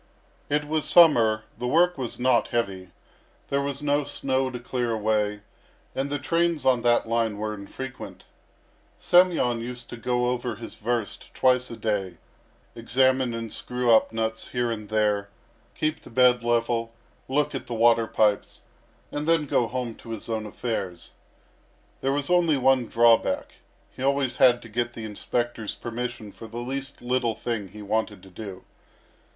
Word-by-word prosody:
It 150 0 0
was 155 0 -1
summer; 115 -11 +6 0.2
the 125 - -2
work 175 +6 +3
was 125 -4 -4
not 130 +1 +3
heavy; 95 -6 -2 0.6
there 140 0 +1
was 140 0 -3
no 145 0 +2
snow 135 -2 -1
to 125 -1 -6
clear 120 0 -2
away, 105 -1 0 0.5
and 135 +1 -2
the 145 - -1
trains 165 +2 0
on 125 -2 +4
that 120 -1 +3
line 115 -2 0
were 105 0 -3
infrequent. 115 +6 -8 0.7
Semyon 170 -10 +3
used 120 0 -7
to 120 - -7
go 125 +1 0
over 125 -2 -2
his 120 - -9
verst 115 -1 -3
twice 125 -1 +3
a 115 - -7
day, 100 -5 -2 0.6
examine 130 +1 +1
and 115 -1 -5
screw 125 -1 -1
up 110 - +5
nuts 110 0 -2
here 120 -1 -1
and 105 -2 -6
there, 105 -2 +1 0.5
keep 155 0 -1
the - - -13
bed 125 0 +4
level, 115 -1 0 0.3
look 145 +2 0
at - - -5
the 120 - -4
water 115 0 +4
pipes, 105 -2 +1 0.5
and 145 +1 -3
then 165 -2 +3
go 125 -4 +1
home 125 -2 -3
to - - -13
his 115 -2 -6
own 110 -2 -3
affairs. 100 -6 -4 0.9
There 135 - 0
was 145 +3 -1
only 170 -4 +4
one 130 -2 +3
drawback 115 0 +3 0.4
he - - -10
always 135 -2 +1
had 125 -3 +5
to - - -10
get 120 +2 -2
the 115 -2 -7
inspector's 115 +1 -3
permission 120 -2 -5
for 115 - -11
the 115 +1 -9
least 135 +2 -5
little 120 -2 0
thing 110 -4 -3
he 105 +3 -11
wanted 105 -2 -2
to 95 - -14
do. 95 -1 -8
120 Hz, 165 wpm, -25 LUFS, 110-130 Hz, 0.9 s, summer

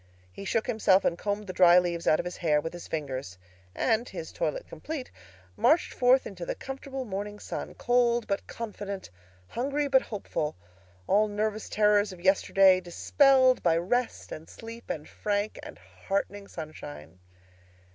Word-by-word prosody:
He 195 - -8
shook 225 +3 0
himself 195 -4 +3
and 170 - +2
combed 205 +3 -3
the 185 - -6
dry 175 -1 +7
leaves 175 -2 0
out 155 - +5
of - - -2
his 180 - -5
hair 155 -4 +2
with 165 +3 -5
his 175 - -8
fingers; 135 - -4 0.4
and, 230 +2 +1
his - - -7
toilet - - -3
complete, 295 -5 -6 0.4
marched 305 +8 +3
forth 255 +1 +4
into 190 -4 -7
the - - -3
comfortable 270 0 -6
morning 205 0 -5
sun, - - -6
cold 240 -1 +2
but 200 -1 -2
confident, 205 - -6 0.4
hungry 285 +4 -1
but 265 -2 +5
hopeful, 175 -7 -4 0.5
all 210 - +3
nervous 215 +1 -2
terrors 210 -1 +3
of 185 - -11
yesterday 190 0 +5
dispelled 260 - +4
by 165 -2 +3
rest 235 +8 -1
and 155 - -8
sleep 230 +1 -10
and 150 -1 -4
frank 205 0 -2
and - - -10
heartening 200 0 -4
sunshine. 85 - -9
205 Hz, 155 wpm, -28 LUFS, 175-240 Hz, 0.5 s, dry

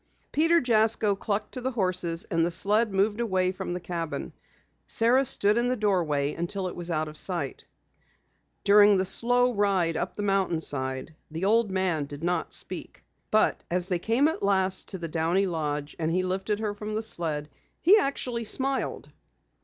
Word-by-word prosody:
Peter 330 +3 +4
Jasko 220 -4 +2
clucked 205 +1 -3
to 255 - -6
the 260 - -1
horses, 185 -7 -1
and 165 -2 0
the 170 - +1
sled 205 +6 +2
moved 205 +3 +1
away 185 -5 +1
from 185 - -6
the 180 - -3
cabin. 170 -2 -5 0.5
Sara 240 +4 +3
stood 210 -2 +3
in 240 - +1
the 250 - +1
doorway 165 - 0
until 185 +3 -3
it 180 - -6
was 175 0 -3
out 155 -2 -1
of 155 0 -7
sight. 180 -3 -2 1.0
During 205 0 +6
the 185 - +1
slow 245 +5 +2
ride 195 -5 +1
up 175 +3 -3
the 205 - -4
mountain 195 -4 +1
side, 130 -1 -3 0.2
the 165 +4 -4
old 225 +1 +3
man 185 -6 0
did 145 +2 -9
not 175 -1 -1
speak. - - -6 0.3
But 215 - +2
as 180 0 +1
they 180 -2 0
came 230 - +2
at 320 - -3
last 190 -1 +1
to 190 - -5
the 170 -2 -5
Downey 165 +4 +1
lodge, 150 -4 -3
and 160 -1 0
he 185 +2 +1
lifted 190 +3 -1
her 210 -2 -1
from 210 +1 -6
the 220 - -1
sled, 160 -8 -2 0.3
he 400 +6 +6
actually 250 - -2
smiled. 265 +4 -2
190 Hz, 180 wpm, -27 LUFS, 170-220 Hz, 1.0 s, During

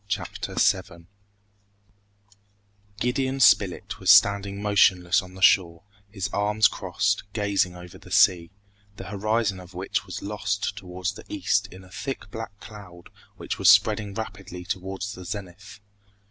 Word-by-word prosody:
Chapter 100 -4 -5
7 85 0 0 1.9
Gideon 130 +4 -1
Spilett - - +3
was - - -2
standing 100 0 +5
motionless 95 -4 +3
on 90 0 -13
the 95 - -6
shore, 85 -3 +4 0.3
his 95 -3 -4
arms 105 +1 +2
crossed, 95 +2 -1
gazing 100 -4 0
over 90 0 -12
the - - -15
sea, 85 -3 +4 0.5
the - - -9
horizon 105 0 -1
of 90 0 -14
which 95 +2 -3
was - - -7
lost 100 0 -2
towards 90 -2 -4
the - - -12
east - - 0
in 95 +1 -13
a 95 - -17
thick 105 0 -6
black 105 -3 -8
cloud 100 -5 -13 0.3
which - - -5
was - - +5
spreading 105 -2 +4
rapidly 95 -5 -7
towards 95 +2 -4
the 95 - -10
zenith. 100 +2 -8
100 Hz, 140 wpm, -25 LUFS, 90-105 Hz, 1.9 s, standing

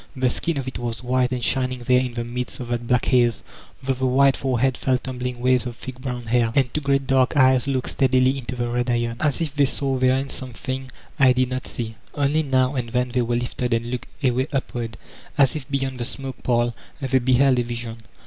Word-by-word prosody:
The 130 -1 +1
skin 165 +3 -2
of 135 -2 -3
it 130 - -4
was 120 -1 -4
white 125 0 +1
and 125 -1 -2
shining 130 -1 -1
there 125 +1 +4
in 125 -2 -3
the 120 - -2
midst 120 +1 -5
of 125 -2 -6
that 120 -1 -2
black 125 -1 +2
haze; 120 -4 +3 0.4
over 135 0 +1
the 130 0 -1
wide 135 +1 +4
forehead 130 -1 +1
fell 130 -1 +1
tumbling 125 -1 -5
waves 125 0 +2
of 120 - -6
thick 130 +1 -9
brown 125 -2 -4
hair, 115 0 +2
and 130 -4 +2
two 150 - -1
great 140 -1 +1
dark 130 +1 +2
eyes 130 -1 +5
looked 130 -2 -1
steadily 130 0 +3
into 125 -1 -5
the 120 -1 -1
red 120 +1 -1
iron, 120 -1 0
as 150 +1 0
if 155 -4 -2
they 145 -1 +4
saw 135 -1 -1
therein 130 +2 +2
something 130 +1 -5 0.3
I 130 -2 +6
did 125 0 +1
not 130 0 -3
see; 115 -2 -4 0.2
only 145 +2 +2
now 130 -2 +2
and 125 -4 -2
then 125 +1 0
they 125 +1 +1
were 120 0 0
lifted, 120 0 -1
and 115 +1 -3
looked 125 - -4 0.2
away 130 +1 +2
upward, 120 -5 -3 0.4
as 140 0 +4
if 150 -2 -6
beyond 135 -2 -2
the - - -1
smoke 135 +2 -6
pall 120 -1 +1 0.3
they 130 -1 +2
beheld 130 +1 +4
a - - +2
vision. 120 -1 -5
125 Hz, 225 wpm, -23 LUFS, 120-135 Hz, 0.4 s, I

